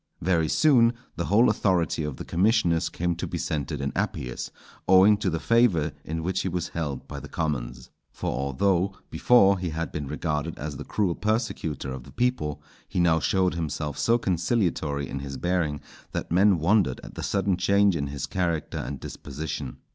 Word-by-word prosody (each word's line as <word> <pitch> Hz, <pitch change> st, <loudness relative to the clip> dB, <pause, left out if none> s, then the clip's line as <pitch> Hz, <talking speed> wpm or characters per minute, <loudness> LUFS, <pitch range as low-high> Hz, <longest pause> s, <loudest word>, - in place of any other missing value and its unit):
Very 85 Hz, -3 st, +2 dB
soon 120 Hz, -6 st, +5 dB, 0.2 s
the 85 Hz, -, -2 dB
whole 110 Hz, +5 st, +4 dB
authority 90 Hz, -7 st, +1 dB
of 75 Hz, -3 st, -4 dB
the -, -, -7 dB
commissioners 90 Hz, -3 st, +2 dB
came 85 Hz, 0 st, -1 dB
to -, -, -3 dB
be -, -, -4 dB
centred 70 Hz, -3 st, -3 dB
in 70 Hz, 0 st, -1 dB
Appius, 60 Hz, -1 st, -3 dB, 0.4 s
owing 95 Hz, +3 st, +7 dB
to 100 Hz, -2 st, -1 dB
the 80 Hz, -1 st, -2 dB
favour 100 Hz, -9 st, +3 dB
in 80 Hz, +1 st, -4 dB
which 95 Hz, +1 st, 0 dB
he 95 Hz, -, -2 dB
was 90 Hz, 0 st, -3 dB
held 75 Hz, -5 st, -4 dB
by -, -, -6 dB
the -, -, -10 dB
commons. 65 Hz, -6 st, -3 dB, 0.2 s
For -, -, -3 dB
although 85 Hz, +9 st, +1 dB, 0.2 s
before 100 Hz, -6 st, +5 dB
he 90 Hz, -1 st, -2 dB
had 80 Hz, -1 st, -3 dB
been 75 Hz, -2 st, -4 dB
regarded 75 Hz, +1 st, -2 dB
as 75 Hz, +1 st, -5 dB
the -, -, -6 dB
cruel 100 Hz, -5 st, 0 dB
persecutor 85 Hz, -, -2 dB
of 65 Hz, -, -6 dB
the -, -, -13 dB
people, 75 Hz, -, -1 dB, 0.2 s
he -, -, -2 dB
now 85 Hz, -2 st, +4 dB
showed 95 Hz, +3 st, +1 dB
himself 75 Hz, -3 st, -3 dB
so 115 Hz, +1 st, +3 dB
conciliatory 85 Hz, -, 0 dB
in 70 Hz, -, -5 dB
his 70 Hz, -1 st, -6 dB
bearing 80 Hz, -4 st, -1 dB, 0.3 s
that -, -, -4 dB
men 95 Hz, +2 st, +5 dB
wondered 85 Hz, -, +2 dB
at -, -, -10 dB
the -, -, -6 dB
sudden 100 Hz, -1 st, +1 dB
change 100 Hz, +1 st, +3 dB
in 70 Hz, -3 st, -1 dB
his 70 Hz, 0 st, -4 dB
character 85 Hz, -5 st, -2 dB
and 70 Hz, -1 st, -5 dB
disposition. 70 Hz, -2 st, -6 dB
85 Hz, 185 wpm, -26 LUFS, 75-95 Hz, 0.4 s, owing